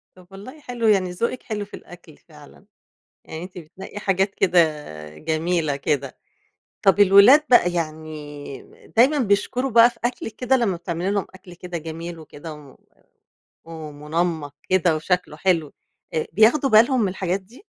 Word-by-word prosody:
طب 180 -1 -18
والله 210 +10 -11
حلو، 245 -5 -3
يعني 190 -4 +3
ذوقِك 235 +7 -3
حلو 210 -2 -4
في 205 - -27
الأكل 175 -3 -13
فعلًا، 150 +4 -18 0.6
يعني 160 +2 -7
أنتِ 180 0 -11
بتنقي 180 +5 -10
حاجات 195 0 0
كده 180 -2 +3 0.6
جميلة 160 -1 -1
كده. 140 -1 -2 0.6
طب 195 +1 +3
الولاد 205 +9 +7
بقى، 180 -8 +5
يعني 155 -4 -7
دايمًا 270 +6 +5
بيشكروا 245 +4 0
بقى 230 +1 +7
في - - -19
أكلِك 240 -3 -4
كده 255 +1 +1
لمّا 210 -8 0
بتعملي 175 +2 -3
لهم 200 -2 -1
أكل 185 -1 -14
كده 175 0 -7
جميل 165 +1 -7
وكده 155 0 -10
و 145 -3 -14 0.9
ومنمّق 155 -1 -4
كده 180 -3 +2
وشكله 170 -1 -2
حلو، 165 -4 0 0.4
آآ، 155 - -1
بياخدوا 245 +7 +4
بالهم 235 +4 +5
من 200 - +1
الحاجات 185 0 -2
دي؟ 230 - -19
180 Hz, 150 wpm, -22 LUFS, 160-210 Hz, 0.9 s, الولاد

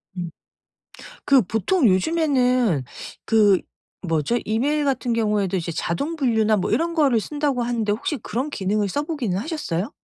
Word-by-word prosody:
음. 175 -2 -4 1.0
그 275 -2 +5
보통 230 - +1
요즘에는 250 - +2 0.4
그 210 -4 +4 0.4
뭐죠? 165 +6 0
이메일 280 +8 0
같은 255 -3 0
경우에도 210 -4 0
이제 170 -1 -3
자동 225 - -2
분류나 220 -7 +2
뭐 185 - -1
이런 335 +1 +1
거를 280 -8 +3
쓴다고 290 +1 -2
하는데 235 -3 -1
혹시 235 +8 -2
그런 255 +4 -4
기능을 205 -4 -1
써 290 +10 -1
보기는 260 - -2
하셨어요? 220 - -3
230 Hz, 315 characters per minute, -22 LUFS, 200-285 Hz, 1.0 s, 그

